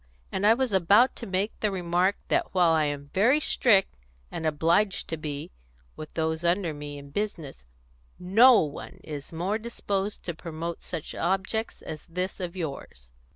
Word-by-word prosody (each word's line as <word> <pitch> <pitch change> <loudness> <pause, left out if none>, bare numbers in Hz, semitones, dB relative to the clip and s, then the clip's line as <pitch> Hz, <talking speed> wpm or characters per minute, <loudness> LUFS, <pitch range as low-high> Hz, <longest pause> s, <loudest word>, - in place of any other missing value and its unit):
And 195 +2 +1
I 225 - +7
was 255 -3 -1
about 200 +7 +5
to 235 - -7
make 195 +3 -1
the 215 - +1
remark 180 +1 +1
that - - 0
while 175 -3 +5
I 160 -1 +3
am 145 -1 -4
very 240 +10 +4
strict 215 -9 +3 0.4
and 160 - -3
obliged 165 +6 +1
to 160 - -1
be 150 -2 -5 0.4
with 155 - -9
those 160 0 -1
under 170 -1 +1
me 145 0 -7
in 140 0 -11
business, 165 - -4 0.5
no 225 +7 +6
one 150 -2 -6
is 145 -2 -7
more 185 +6 -1
disposed 205 -3 -3
to 170 - -3
promote 165 0 -6
such 165 -4 -6
objects 195 +5 -1
as 155 -1 -8
this 180 +4 -3
of 180 -1 -4
yours." 135 - -6
175 Hz, 165 wpm, -27 LUFS, 155-200 Hz, 0.5 s, I